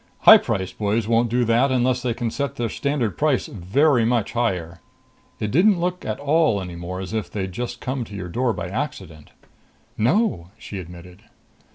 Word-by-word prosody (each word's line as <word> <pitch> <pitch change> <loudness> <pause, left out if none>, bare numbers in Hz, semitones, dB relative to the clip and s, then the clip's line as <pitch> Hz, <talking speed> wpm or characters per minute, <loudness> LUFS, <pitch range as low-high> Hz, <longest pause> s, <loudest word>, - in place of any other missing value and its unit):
High - - +10
priced 95 -1 -3
boys 105 +1 0
won't 115 +1 +2
do 120 +1 +1
that 120 +4 +3
unless 125 0 +1
they 120 -2 -1
can 120 -2 -2
set 140 +1 -3
their 120 -3 -2
standard 140 -6 -2
price 145 -4 +2
very 120 - +2
much 115 -2 +1
higher. 90 -8 -2 0.6
It 105 -1 -2
didn't 180 - +4
look 180 +1 -2
at 110 - -4
all 145 -6 +2
any 90 -2 -6
more 85 +2 -6
as 95 +3 -6
if 110 -1 -2
they'd 95 -3 -4 0.2
come 130 0 -3
to 105 - -10
your 90 -2 -5
door 120 +8 0
by 95 - -4
accident." 95 - -5 0.7
"No," 115 - +1
she 100 -2 -7
admitted. 90 0 -11
115 Hz, 180 wpm, -22 LUFS, 95-130 Hz, 0.7 s, High